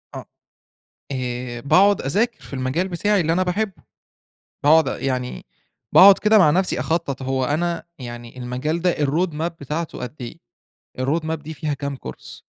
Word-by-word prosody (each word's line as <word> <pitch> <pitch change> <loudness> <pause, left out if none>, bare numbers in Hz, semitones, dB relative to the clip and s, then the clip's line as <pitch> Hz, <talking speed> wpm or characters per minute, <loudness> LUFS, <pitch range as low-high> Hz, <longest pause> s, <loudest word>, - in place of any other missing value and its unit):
آه. - - -7 0.9
آآ 125 -1 -4
باقعد 195 +9 +4
أذاكر 215 - 0
في - - -14
المجال 135 +8 -1
بتاعي 200 +3 +1
اللي 165 -1 +1
أنا 180 +2 +2
باحبه. 190 +2 -2 0.8
باقعد 155 0 +5
يعني 125 -2 -3 0.5
باقعد 195 +1 +9
كده 215 +1 +4
مع 175 -7 +6
نفسي 185 +3 +1
أخطط. 160 -5 -2
هو 130 0 -1
أنا 170 +4 -1 0.2
يعني 120 0 -9
المجال 130 +7 -3
ده 180 0 +2
الroad 150 +5 +1
map 160 +3 -2
بتاعته 150 +4 -4
قد 125 +3 -6
إيه؟ 120 - -7 0.6
الroad 145 +6 0
map 160 - -1
دي 160 0 -8
فيها 150 -1 -2
كام 140 0 -4
كورس؟ 65 - -10
150 Hz, 160 wpm, -22 LUFS, 130-175 Hz, 0.9 s, باقعد